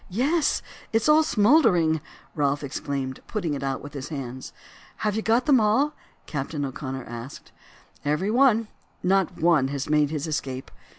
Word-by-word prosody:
"Yes, 280 - +1 0.3
it 225 0 +2
is - - 0
all 305 +1 +6
smouldering!" 205 - +4 0.3
Ralph 145 -1 0
exclaimed, 135 -1 -4
putting 175 -8 -2
it 140 - -4
out 135 -1 -2
with 145 0 -9
his 140 -1 -6
hands. 130 -4 -6 0.5
"Have 210 -1 +1
you 220 - 0
got 230 +3 +2
them 280 -5 +5
all?" 225 +8 +2 0.3
Captain 145 0 -3
O'Connor 130 -1 -5
asked. 120 +3 -9 0.5
"Every 150 +8 0
one; 230 -3 +4 0.4
not 190 -1 +1
one 160 -5 +4
has 140 0 -3
made 150 -1 +3
his 155 -1 -3
escape. 135 -4 -4
155 Hz, 160 wpm, -25 LUFS, 140-220 Hz, 0.5 s, all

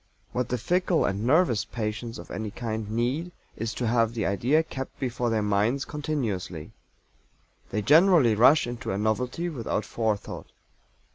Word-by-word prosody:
What 125 -1 -2
the 125 - 0
fickle 180 - +1
and 100 +4 -1
"nervous" 130 - +3
patients 115 0 -4
of - - -10
any 110 +1 -4
kind 110 -1 -4
need 125 +10 -1 0.2
is 115 +1 -3
to 125 - -2
have 115 0 +2
the 110 - -1
idea 125 +11 +2
kept 135 -4 -7
before 125 -2 -1
their 110 -2 +1
minds 105 +7 +1
continuously. 115 - -3 1.0
They 105 +1 -2
generally 155 - +6
rush 125 +8 +5
into 120 -1 -5
a 95 - -1
novelty 125 +10 -1
without 115 -8 -2
Forethought. 110 -3 -3
120 Hz, 150 wpm, -26 LUFS, 110-135 Hz, 1.0 s, generally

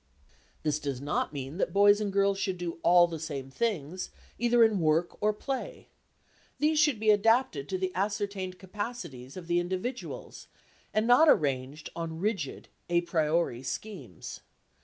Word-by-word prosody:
This 150 -1 0
does 140 -4 -3
not 145 +2 -1
mean 140 +2 -6
that - - -1
boys 205 +1 +6
and 205 -1 -1
girls 200 0 +2
should 190 -2 -1
do 175 -1 -5
all 175 0 +6
the 165 -2 -5
same 140 -4 -5
things, 180 -1 -2 0.3
either 240 0 +5
in 220 -3 +3
work 160 +1 +2
or 210 0 +3
play; 270 - -5 0.7
these 305 +1 +2
should 295 -7 +3
be 215 0 +4
adapted 210 - +2
to 190 - -1
the 185 0 -2
ascertained 200 -1 -2
capacities 190 - -6
of 180 - -7
the 175 +1 +2
individuals 185 +8 -5 0.4
and 215 +1 +1
not 250 +7 +6
arranged 140 - +1
on 165 -1 -4
rigid 195 -8 -2 0.2
a 175 0 +3
priori 160 -6 0
schemes. 135 - -6
185 Hz, 155 wpm, -29 LUFS, 155-215 Hz, 0.7 s, boys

